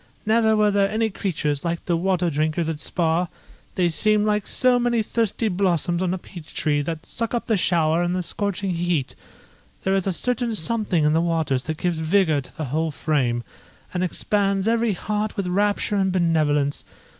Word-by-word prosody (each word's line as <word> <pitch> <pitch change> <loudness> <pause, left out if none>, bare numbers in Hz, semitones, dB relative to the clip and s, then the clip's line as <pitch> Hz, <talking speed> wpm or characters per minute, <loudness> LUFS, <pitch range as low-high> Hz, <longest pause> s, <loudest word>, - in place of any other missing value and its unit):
Never 220 0 +3
were 210 -1 +4
there 200 -1 +2
any 220 +1 0
creatures 150 -7 -2
like 170 -1 -3
the 175 - +1
water 180 0 +1
drinkers 155 +2 0
at 160 -2 -3
spa; 170 +1 0 0.5
they 180 -2 +2
seem 210 +5 +2
like 210 -1 0
so 250 -1 +3
many 240 -2 +1
thirsty 225 0 0
blossoms 180 -3 0
on 185 -2 0
a 185 - -1
peach 175 -3 -12
tree, 145 -1 +1
that 160 +1 -5
suck 230 +1 -3
up 235 - -2
the 225 - +2
shower 170 -3 +2
in 175 0 0
the 180 0 -1
scorching 200 +2 -2
heat. 170 -5 -1 0.7
There 190 - +1
is 195 -1 +1
a - - +2
certain 240 +4 -1
something 205 -3 0
in 150 - +3
the 165 - +3
waters 160 -6 0
that 160 0 -3
gives 175 -2 -1
vigour 160 -2 +2
to 130 - -15
the 155 - -3
whole 160 +1 +1
frame, 135 -6 0 0.5
and 180 0 0
expands 195 +2 0
every 230 -1 +2
heart 210 +3 -3
with 200 - -1
rapture 205 +3 +1
and 190 -1 +2
benevolence. 155 -5 +1
180 Hz, 190 wpm, -23 LUFS, 160-210 Hz, 0.7 s, were